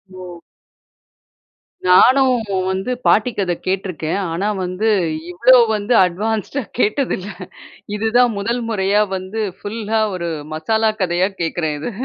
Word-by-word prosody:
ஓ! 180 -2 -9 1.5
நானும் 255 +7 +5 0.3
வந்து 190 +6 -2 0.2
பாட்டி 230 +3 +3
கதை 180 -3 0
கேட்டுருக்கேன். 185 -2 -2
ஆனா 190 +5 -2 0.2
வந்து, 185 +5 -2 0.4
இவ்ளோ 250 +8 +5 0.2
வந்து 210 +4 -1
அட்வான்ஸ்டா 220 +8 -2 0.2
கேட்டதில்ல. 210 -4 0 0.7
இதுதான் 235 +3 +3
முதல் 235 +4 -2
முறையா 205 0 +1
வந்து 190 +4 -5 0.2
ஃபுல்லா 220 +1 -3 0.2
ஒரு 170 -1 -3 0.2
மசாலா 220 +7 +1
கதையா 180 +2 +1
கேக்குறேன் 160 -2 -2
இத. 200 - -4
205 Hz, 110 wpm, -19 LUFS, 180-225 Hz, 1.5 s, நானும்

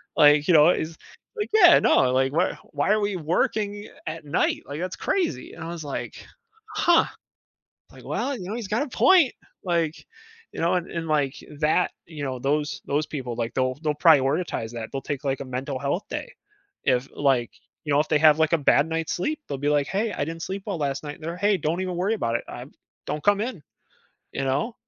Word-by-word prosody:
Like, 150 0 +6
you 180 - +5
know, 155 +2 +7
it's 160 -2 -1 0.4
like, 420 -1 -3
"Yeah, 355 -6 +8
no, 130 - +4
like, 130 +1 +2
why - - +2
are - - -10 0.2
why 145 +7 0
are 215 - +4
we 205 -2 -1
working 205 +5 -1 0.2
at 155 0 -6
night? 145 - 0
Like, 145 +2 -6
that's 185 +1 -3
crazy." 365 -5 -1
And 165 - -9
I - - -5
was 170 -2 -6
like, 140 - -6 0.5
"Huh," 345 -1 +4 0.9
like, - - -14
"well, 280 0 -2
you 185 - -7
know, - - -3
he's 230 -5 -5
got 220 +8 0
a - - -5
point, 340 +1 +5 0.3
like" 170 -3 -1 0.5
you - - -6
know? 170 +2 +2
And 175 - -1
and, 165 -1 -4
like, 145 -3 +1 0.3
that 160 +3 +3 0.2
you 155 -3 -8
know, 130 -2 -3
those 145 +3 -1
those 150 +2 0
people, 125 -5 -5
like, 115 -1 -3
they'll 130 -1 +1
they'll 150 -1 +1
prioritize 150 -5 +3
that, 115 -2 -6
they'll 135 - -3
take, 145 0 -4
like, 135 -1 -1
a 140 - -5
mental 130 +1 -4
health 145 +7 -1
day - - -5 0.5
if, 125 +1 +1
like, 135 -4 +2 0.4
you 145 - 0
know, 140 - +4
if 155 - +1
they 150 -2 +3
have, 155 -1 +6
like, 160 +1 +2
a - - +5
bad 145 +1 +3
night's 165 0 -2
sleep, 300 - -2
they'll 140 - -3
be 145 +2 -1
like, 145 -1 +2
"Hey, 205 +1 -1
I - - -2
didn't 165 +1 -6
sleep 195 +1 -4
well 195 -4 -2
last 140 -1 -1
night." 145 0 -6
And 165 - -17
they're, 170 +2 -4
"Hey, 200 0 +2
don't 165 +4 -1
even 185 -1 -3
worry 195 +5 +1
about 115 - -1
it, - - -1
I'm - - -9 0.4
don't 150 - -3
come 205 0 +3
in," 215 - -4 0.7
you - - -2
know? 145 - -1
155 Hz, 220 wpm, -25 LUFS, 140-185 Hz, 0.9 s, Yeah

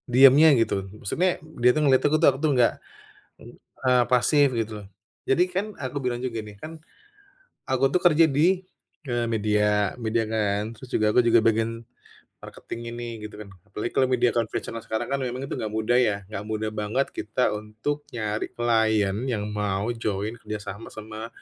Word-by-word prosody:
Diamnya, 135 +5 +7
gitu. 100 -4 0
Maksudnya, 175 - 0 0.2
dia 125 - +6
tuh - - +2
ngeliat 130 -2 +4
aku 150 +1 +4
tuh 160 - +4
aku 130 - -8
tuh 155 -2 +2
enggak 120 -1 +4 0.7
ng - - -12 0.3
eee, 125 -1 +4
pasif 140 +4 +4
gitu, 115 -1 -2
lho. - - -11 0.4
Jadi 170 +7 +4
kan 190 +3 -1
aku 130 +1 -4
bilang 120 -1 -1
juga 120 -3 -3
nih, 105 -1 -11
kan 160 +5 -9 0.9
aku 130 0 0
tuh 180 - +2
kerja 165 -2 +5
di, 170 +6 +2 0.4
eee, 120 -1 0
media 105 -2 +1
media 115 0 0
kan. 105 -2 0
Terus 130 - -12
juga 105 0 +2
aku 125 - +4
juga 115 0 +6
bagian 115 +1 0 0.6
marketing-in 115 0 -8
nih 120 0 -5 0.2
gitu, - - -16
kan. 105 - -9 0.2
Apalagi 105 +3 -4
kalau 130 - +3
media 125 -1 +2
konvensional 115 0 -3
sekarang 110 0 -4
kan 140 - +1
memang 130 0 -3
itu 140 - -5
nggak 110 -1 -4
mudah, 110 +3 +2
ya. 110 -5 +2 0.2
Nggak 100 -1 -5
mudah 110 0 -2
banget 110 +6 -1
kita 110 +4 -1
untuk 110 +8 -4
nyari 110 -2 -2
klien 110 -4 +2
yang 110 -5 -1
mau 105 +2 -1
join 110 -2 -3
kerjasama 105 0 -7
sama 110 +1 -8
115 Hz, 175 wpm, -25 LUFS, 105-130 Hz, 0.9 s, Diamnya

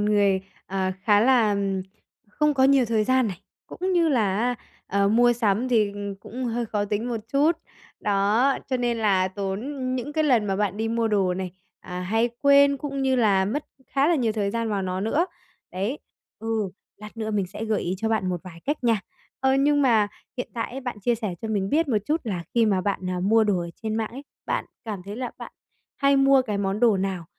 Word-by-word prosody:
người, 205 -2 +3 0.3
ờ, 190 0 -1
khá 205 -1 +4
là 230 -4 +4 0.7
không 300 +6 +1
có 265 -1 +4
nhiều 270 -2 +5
thời 220 -2 +1
gian 255 -1 +3
này, 185 -1 -7 0.3
cũng 370 +1 -3
như 340 -2 +3
là 215 -9 +2
á, 245 +2 +1 0.3
ờ, 200 0 +2
mua 240 +3 +5
sắm 230 +1 +1
thì 215 -4 +2 0.3
cũng 255 +4 -6
hơi 235 -1 -1
khó 205 -1 -1
tính 210 +4 -2
một 230 -3 -2
chút. 295 +4 +4 0.5
Đó, 210 +7 +2
cho 260 - +1
nên 240 -1 0
là 190 -4 +2
tốn 195 +1 -3 0.3
những 260 +4 -4
cái 310 0 +1
lần 240 -7 +3
mà 195 -1 0
bạn 205 -1 0
đi 225 +1 -1
mua 230 0 0
đồ 195 -4 +2
này, 185 -1 -4 0.3
à, 180 0 -6
hay 225 +6 +1
quên 280 0 +6
cũng 275 -1 -4
như 265 -1 +2
là 200 -5 +3
mất 270 +10 -2 0.2
khá 275 +2 +2
là 345 - +4
nhiều 235 -7 +1
thời 205 -2 -1
gian 230 +1 -2
vào 200 -2 -1
nó 185 0 -2
nữa. 285 - +1 0.5
Đấy. 200 +10 -2 0.4
Ừ, 220 -3 -1 0.3
lát 210 +2 -11
nữa 220 -1 -3
mình 200 -3 0
sẽ 205 +4 -6
gợi 220 -2 0
ý 180 - -1
cho 225 - -1
bạn 215 -4 0
một 180 -2 -2
vài 175 -2 -11
cách 290 -3 -2
nha. 225 -3 +3 0.4
Ờ, 265 0 +3
nhưng 285 +1 +3
mà 220 -5 +4 0.3
hiện 250 - -4
tại 230 - -3
ấy, 265 - -6
bạn 245 -5 -5
chia 240 +4 +2
sẻ 215 -6 -4
cho 225 - -3
mình 200 -3 0
biết 320 0 +2
một 220 -4 +2
chút 315 +2 +1
là 185 -6 -3
khi 230 -2 +4
mà 195 -3 +2
bạn, 200 +1 -1
ờ, 180 - -2
mua 220 +4 +4
đồ 205 -3 +1
ở 170 0 -5
trên 220 -1 -2
mạng 220 -1 -2
ấy, 265 +4 -8 0.2
bạn - - -1 0.2
cảm 210 -4 -4
thấy 205 +2 -7
là 250 -1 -3
bạn - - -9 0.4
hay 275 0 +3
mua 270 -1 +5
cái 210 -5 -3
món 200 +1 -1
đồ 225 -5 +5
nào 190 -3 -2
220 Hz, 225 wpm, -25 LUFS, 200-255 Hz, 0.7 s, quên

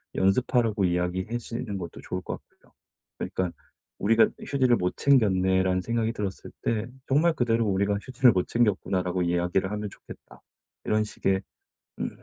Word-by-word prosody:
연습하라고 110 +1 +2
이야기해시는 95 +5 -2
것도 85 -3 -7
좋을 90 - -4
것 - - -5
같고요. - - -29 0.5
그러니깐 90 -2 -2 0.5
"'우리가 115 +3 +5
이 - - -9
휴지를 130 -4 +3
못 90 0 -1
챙겼네.'라는 95 -7 +3
생각이 115 +2 -1
들었을 100 -4 -5
때 115 0 -1 0.2
정말 155 +5 +3
그대로 115 -4 +1
"우리가 100 +1 +1
휴지를 130 0 +4
못 90 -3 0
챙겼구나."라고 95 -5 +1
이야기를 90 +2 0
하면 105 0 -3
좋겠다." - - -14 0.4
이런 110 0 +2
식의 95 -2 -1 0.6
음 - - -1
100 Hz, 370 characters per minute, -27 LUFS, 95-115 Hz, 0.6 s, 우리가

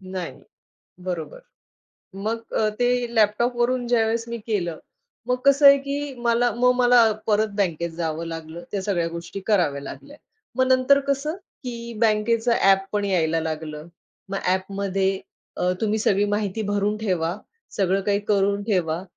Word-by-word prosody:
नाही. 185 -2 -6 0.7
बरोबर. 180 - -4 0.8
मग 220 +4 -3
अ, 215 - +2
ते 245 0 +2
लॅपटॉपवरून 240 +3 +2
ज्यावेळेस 230 -1 +1
मी 235 0 -4
केलं 175 -7 -1 0.5
मग 250 - +1
कसं 280 +1 +6
आहे 280 0 +9
की 280 0 -4
मला 235 +1 +3
मग 250 +1 +4
मला 245 -1 +5 0.3
परत 215 0 +2
बँकेत 170 -4 0
जावं 165 0 -3
लागलं. 165 0 -7
त्या 200 -2 -2
सगळ्या 175 -4 0
गोष्टी 170 +3 -7
कराव्या 170 -10 +2
लागल्या. 290 - -10 0.4
मग 260 0 +3
नंतर 260 +2 +4
कसं, 280 +4 -1 0.3
की 235 -1 -6
बँकेचं 225 +1 +2
ॲप 195 0 +5
पण 205 -1 0
यायला 165 -4 +1
लागलं. 155 0 -5 0.4
मग 195 0 -2 0.2
ॲपमध्ये 195 0 -1 0.4
अ, 180 0 +2
तुम्ही 220 0 +1
सगळी 200 -1 +2
माहिती 205 +1 -1
भरून 205 +1 0
ठेवा. 180 -5 -1 0.4
सगळं 195 -1 +2
काही 200 0 +2
करून 200 0 +2
ठेवा. 180 -5 0
205 Hz, 145 wpm, -23 LUFS, 180-235 Hz, 0.8 s, आहे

